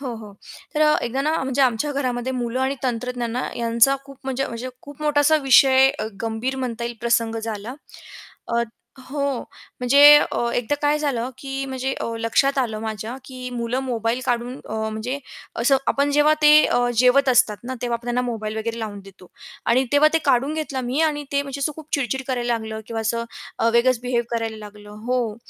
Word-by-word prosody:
हो, 255 -4 -4
हो. 210 -2 -11 0.4
तर 305 - 0 0.2
एकदा 255 +3 -2
ना, 310 +2 +1
म्हणजे 265 +1 0
आमच्या 260 +4 +1
घरामध्ये 255 -2 -2
मुलं 245 0 -2
आणि 270 +1 0
तंत्रज्ञान 245 -1 -2 0.2
यांचा 235 +3 +3
खूप 275 -1 -14
म्हणजे 270 +1 -1
म्हणजे 235 +2 -6
खूप 285 +1 -11
मोठासा 300 +1 +3
विषय, 265 0 +6 0.3
गंभीर 230 +4 -2
म्हणता 240 -3 -3
येईल 235 0 -5
प्रसंग 230 -1 +1
झाला. 220 +3 -5 0.8
अ, 235 - +3 0.4
हो, 280 +3 -6 0.6
म्हणजे 250 +3 +3 0.6
एकदा 245 +3 0
काय 295 +1 +2
झालं 260 -5 -1
की, 270 0 -4
म्हणजे 265 0 -3
अ, - - -2
लक्षात 275 +5 +2
आलं 225 -4 -1
माझ्या 220 +2 -5
की 255 -1 -7
मुलं 240 +1 -2
मोबाईल 235 -1 -1
काढून 245 +1 -1
अ, - - -3
म्हणजे 220 +4 -3 0.4
असं 270 +3 +4
आपण 280 +1 +2
जेव्हा 295 +1 +4
ते 300 0 +8
अ, - - +1 0.2
जेवत 255 +2 +5
असतात 220 -4 +3
ना, 260 - -4
तेव्हा 240 -1 0
आपण 235 - -16
त्यांना 240 +1 0
मोबाईल 220 -3 -4
वगैरे 230 +1 -3
लावून 205 -2 -5
देतो 190 -2 -16 0.4
आणि 255 +3 +3
तेव्हा 290 +1 +6
ते - - +5
काढून 275 +3 +2
घेतलं 295 -4 -3
मी 255 +6 -1
आणि 295 -2 0
ते 280 - +2
म्हणजे 280 0 -7
असं 300 +2 0
खूप 310 -1 -11
चिडचिड 265 -1 -1
करायला 240 -2 0
लागलं 220 -1 -5
किंवा 225 -1 -4
असं 230 +1 -1 0.5
वेगळंच 240 0 +3
बिहेव 245 -1 0
करायला 225 -1 -2
लागलं 210 0 -12 0.2
हो, 245 -4 -1
250 Hz, 180 wpm, -22 LUFS, 230-270 Hz, 0.8 s, ते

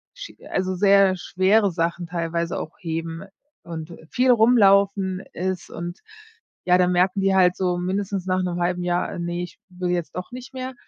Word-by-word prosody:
Sch - - -9 0.2
also 185 0 -1
sehr 195 0 +5
schwere 190 +5 +2
Sachen 170 +1 -2
teilweise 170 0 -2
auch 160 - -7
heben 165 0 -4 0.4
und, 165 -1 -7
äh, 160 - -13
viel 255 0 +3
rumlaufen 200 -5 +4
ist 185 0 -3
und, 175 +1 -7 0.6
ja, 180 0 +5
da 180 -1 +3
merken 185 +2 +2
die 195 0 +2
halt 180 -1 +4
so 180 -2 0
mindestens 190 +1 -2
nach 185 0 0
'nem 175 -1 -2
0,5 175 0 0
Jahr, 175 0 0
äh, - - -6
ne, 175 +1 -3
ich 175 - -10
will 180 -1 -3
jetzt 175 -2 -3
doch 180 +6 -6
nicht 255 +1 -9
mehr. 260 0 -5
180 Hz, 180 wpm, -23 LUFS, 175-195 Hz, 0.6 s, sehr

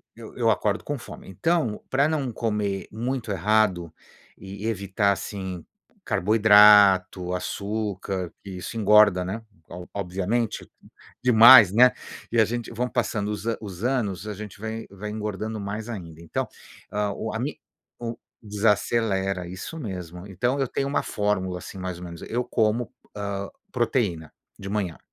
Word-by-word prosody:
eu 115 -1 -10
eu - - -16
eu 115 -2 +3
acordo 105 -1 0
com 145 - -3
fome, 120 - -11
então 125 - 0
para 140 +3 +3
não 145 -5 -1
comer 105 -4 -2
muito 120 0 -3
errado 95 -3 +1 0.5
e 100 +2 -7
evitar, 100 -1 +1
assim, 95 -2 -6 0.4
carboidrato, 105 -3 +5
açúcar, 100 -2 -3
que 100 - -9
isso 90 +4 -7
engorda, 105 -3 +5
né, 105 +5 -4 0.5
obviamente, 100 +4 -2 0.5
demais, 115 -3 +9
né. 125 +3 +7 0.4
E 120 - +2
a - - +7
gente 120 +1 -4
vão 125 +2 -2
passando 105 -4 -1
os 105 +1 -5 0.2
os 100 -2 -8
anos, 110 -6 -1
a 105 - -3
gente 105 -1 -9
vai 110 +1 -5
vai 100 +2 -7
engordando 105 +1 -4
mais 105 +2 -5
ainda, 85 -8 -8
então, 85 - -3 0.4
a 105 -1 -1
o 110 +2 -5
a 110 - -3
me 140 +5 -3 0.4
o 115 -1 -5 0.2
desacelera, 100 -3 0
isso 95 - -7
mesmo. 90 - -7
Então 120 +7 -1
eu 135 - +1
tenho 135 +3 -2
uma 140 - 0
fórmula, 95 -3 -1
assim, 95 - -10
mais 90 -2 -4
ou - - -9
menos, 85 -1 -9
eu 120 +2 -2
como, 110 0 0 0.3
hã, 100 -1 -3 0.2
proteína 110 - -1 0.3
de 100 - -7
manhã, 100 -5 -2
105 Hz, 150 wpm, -25 LUFS, 95-115 Hz, 0.5 s, demais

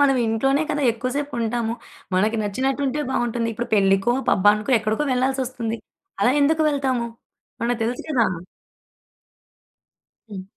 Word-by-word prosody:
మనం 270 -2 +4
ఇంట్లోనే 270 +6 +1
కదా 295 -1 -1
ఎక్కువ 245 +3 -3
సేపుంటాము. 235 -5 -2 0.4
మనకి 215 +5 +2
నచ్చినటుంటే 270 +7 -1
బావుంటుంది. 235 -2 -1
ఇప్పుడు 235 +2 -4
పెళ్ళికో, 195 +3 +3 0.2
పబ్బానికో, 210 +5 +3
ఎక్కడికో 220 +7 -1
వెళ్ళాల్సొస్తుంది. 250 -3 -1 0.4
అలా 245 - +4
ఎందుకు 315 +2 +3
వెళ్తాము? 260 -4 0 0.6
మనకు 240 0 0
తెలుసు 245 +2 -2
కదా! 240 -6 +3 2.0
హ్మ్. 195 -2 -6
240 Hz, 115 wpm, -22 LUFS, 220-270 Hz, 2.0 s, మనం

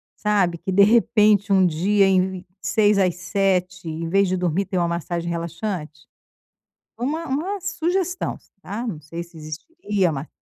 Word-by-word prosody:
sabe, 195 -5 +1
que 190 - -4
de 200 +2 +6
repente 210 -2 +4
um 190 -1 +5
dia 195 +5 +3
em 190 -1 +4
v 185 -1 -8
6 210 -2 +2
às 185 -3 +2
7, 180 -2 -1
em 165 +1 -4
vez 195 +1 +3
de 185 - 0
dormir, 180 +2 0
ter 185 - -3
uma 170 - +1
massagem 170 0 -3
relaxante, 170 -2 -5 0.9
uma 305 +7 -2
uma 350 +10 -2
sugestão, 365 +1 -1 0.2
tá, 220 +6 -5
não 180 -10 -4
sei 165 +3 -7
se 170 -1 -16
existiria 185 - -2
uma 140 +1 -5
190 Hz, 160 wpm, -22 LUFS, 170-210 Hz, 0.9 s, de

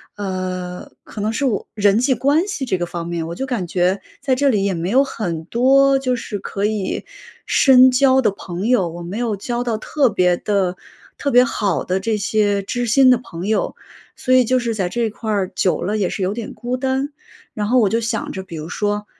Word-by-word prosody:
呃， 185 -2 -5
可 210 - -8
能 215 +1 0
是 275 +5 -1
我 220 -6 -1
人 205 0 +3
际 260 0 +2
关 285 - +2
系 290 -10 -3
这 190 -7 0
个 175 - -1
方 170 -1 -5
面， 170 -1 -3
我 170 - -6
就 270 - -3
感 230 -9 -3
觉 180 +3 0 0.2
在 265 - 0
这 280 +1 +2
里 200 -5 +1
也 195 - 0
没 170 +2 -3
有 265 +5 +4
很 170 - -4
多， 270 +5 +4
就 255 -2 0
是 210 -3 -5
可 200 +1 -3
以 210 -3 -2 0.4
深 260 -1 +6
交 260 +1 +4
的 240 - +2
朋 185 0 -6
友， 195 -9 +2
我 170 +1 -8
没 190 +6 -5
有 235 -3 -1
交 240 +4 -3
到 230 -3 -1
特 275 +2 +1
别 180 -3 +2
的 190 -1 0 0.4
特 280 - -1
别 250 -1 +6
好 205 -6 -1
的 185 +1 0
这 215 +2 -1
些 205 -1 +1
知 245 +4 -2
心 255 +3 +6
的 250 - +5
朋 175 -6 -8
友， 220 - 0 0.4
所 255 - 0
以 255 -1 +6
就 255 +2 +1
是 235 -2 -1
在 190 -4 -1
这 235 +1 -1
块 220 0 -5
儿 195 -3 -1
久 185 - +1
了 210 +4 -1
也 190 - +1
是 190 - -3
有 190 +2 0
点 230 -1 -6
孤 240 +3 -3
单， 265 +2 -1 0.4
然 210 -1 -2
后 255 +3 +3
我 220 -5 +4
就 230 +1 0
想 225 -1 -2
着， 190 - -5
比 185 -3 -10
如 155 +1 -6
说， 205 +2 -2
215 Hz, 245 characters per minute, -20 LUFS, 190-250 Hz, 0.4 s, 深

